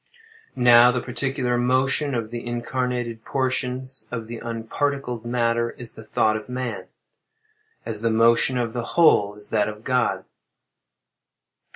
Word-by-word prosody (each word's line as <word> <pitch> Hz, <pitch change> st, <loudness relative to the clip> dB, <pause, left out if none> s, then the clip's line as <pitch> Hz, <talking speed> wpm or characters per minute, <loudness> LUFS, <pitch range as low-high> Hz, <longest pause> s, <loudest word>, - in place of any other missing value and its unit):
Now, 120 Hz, -1 st, +7 dB
the 125 Hz, -, -1 dB
particular 125 Hz, -1 st, -1 dB
motion 130 Hz, +3 st, +1 dB
of 115 Hz, -1 st, -3 dB
the 120 Hz, -1 st, -5 dB
incarnated 120 Hz, -1 st, -3 dB
portions 130 Hz, -2 st, -2 dB
of 115 Hz, -2 st, -5 dB
the 115 Hz, +1 st, -7 dB
unparticled 120 Hz, +1 st, -3 dB
matter 115 Hz, -1 st, 0 dB
is 120 Hz, -2 st, -9 dB
the 110 Hz, -, -11 dB
thought 110 Hz, 0 st, +1 dB
of 110 Hz, +2 st, -6 dB
man; 125 Hz, -1 st, -4 dB, 1.0 s
as 110 Hz, -2 st, -5 dB
the 115 Hz, -, +1 dB
motion 115 Hz, +3 st, +4 dB
of 120 Hz, -2 st, -2 dB
the 120 Hz, -1 st, -5 dB
whole 105 Hz, -11 st, +5 dB
is 105 Hz, 0 st, -11 dB
that 105 Hz, -1 st, +1 dB
of 105 Hz, +1 st, -9 dB
God. 125 Hz, -2 st, 0 dB
120 Hz, 140 wpm, -23 LUFS, 115-125 Hz, 1.0 s, Now